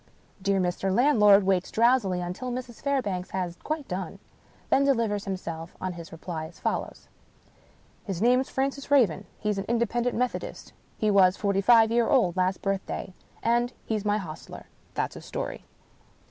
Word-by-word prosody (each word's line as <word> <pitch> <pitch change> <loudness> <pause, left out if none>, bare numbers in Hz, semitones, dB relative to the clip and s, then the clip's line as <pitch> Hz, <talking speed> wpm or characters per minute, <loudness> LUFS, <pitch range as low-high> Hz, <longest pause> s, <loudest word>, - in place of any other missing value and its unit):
Dear 195 0 +1
Mr. 185 +1 0
Landlord 210 -4 +5
waits 190 -1 +1
drowsily 225 -6 +2
until 180 +9 -4
Mrs. 245 -1 -6
Fairbank 210 -11 -1
has 180 -2 -2
quite 305 -2 -3
done 185 0 -4 0.3
— - - -31
then 275 - +5
delivers 230 -7 +1
himself 170 -4 -5
of 185 -1 -3
his 170 -1 -10
reply 165 -1 -5
as 170 - -17
follows: - - -3 0.5
" - - -32
His 190 -4 -3
name's 250 +4 +3
Francis 275 +1 -2
Raven. 210 - +3
He's 210 -2 -1
an 195 - -4
Independent 235 +1 0
Methodist. 250 0 -3 0.2
He 215 -1 +1
was 190 -1 +5
forty 200 -2 +1
five 225 +1 +6
year 235 0 +2
old 185 -10 +3
last 185 0 0
birthday. 195 -1 -3 0.3
And 240 +1 +2
he's 215 -2 -2
my 210 0 +1
hostler. 165 -6 -8 0.3
That's - - -1
his - - -10
story." - - -5
205 Hz, 160 wpm, -27 LUFS, 185-240 Hz, 0.5 s, five